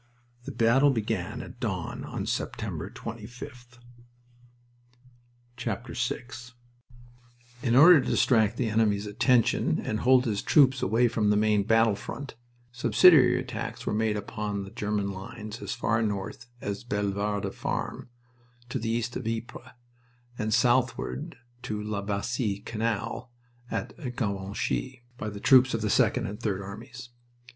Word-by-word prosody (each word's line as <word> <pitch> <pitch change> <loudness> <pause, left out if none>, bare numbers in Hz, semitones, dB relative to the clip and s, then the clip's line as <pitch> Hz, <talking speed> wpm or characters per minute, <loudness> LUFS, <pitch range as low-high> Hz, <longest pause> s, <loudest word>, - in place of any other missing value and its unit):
The - - -5
battle 120 +5 +4
began 110 -7 -2
at - - -12
dawn - - -3
on - - -5
September - - -3
25th. 120 +2 -9 1.8
VI 120 +3 -2 1.4
In 120 -3 +1
order 160 +2 +9
to - - -4
distract 110 -2 +3
the 125 - 0
enemy's 105 -2 +1
attention 115 +3 +2
and 110 - -2
hold 130 +2 +4
his 105 -4 -1
troops 135 -3 +4
away 115 +5 +3
from 110 -2 +1
the 105 - +3
main 105 -1 +3
battle 110 +1 +3
front, 135 +7 -7 0.4
"subsidiary 125 +2 +6
attacks" 125 -4 -5
were - - -1
made 110 0 +1
upon 105 -1 -4
the 95 - -10
German 105 -1 -2
lines 105 +3 -8
as - - -4
far 115 -2 0
north 110 +4 -3
as 100 +1 -4
Bellewarde 100 -2 -2
Farm, - - -4 0.6
to - - -2
the 115 0 -3
east 120 +1 -1
of 125 - -4
Ypres, 115 +2 -5 0.7
and 110 -2 -2
southward 125 +6 +1 0.2
to 110 -4 -4
La 105 -1 -3
Bassee 100 +1 -2
Canal 115 +2 -3 0.4
at - - -4 0.2
Givenchy, 105 +3 -3 0.2
by 105 - -3
the 100 -1 -8
troops 130 +1 +5
of 115 - -2
the 105 -1 0
Second - - +2
and 105 +2 -6
Third 100 -4 -2
Armies. 115 +5 -9
115 Hz, 135 wpm, -27 LUFS, 105-125 Hz, 1.8 s, order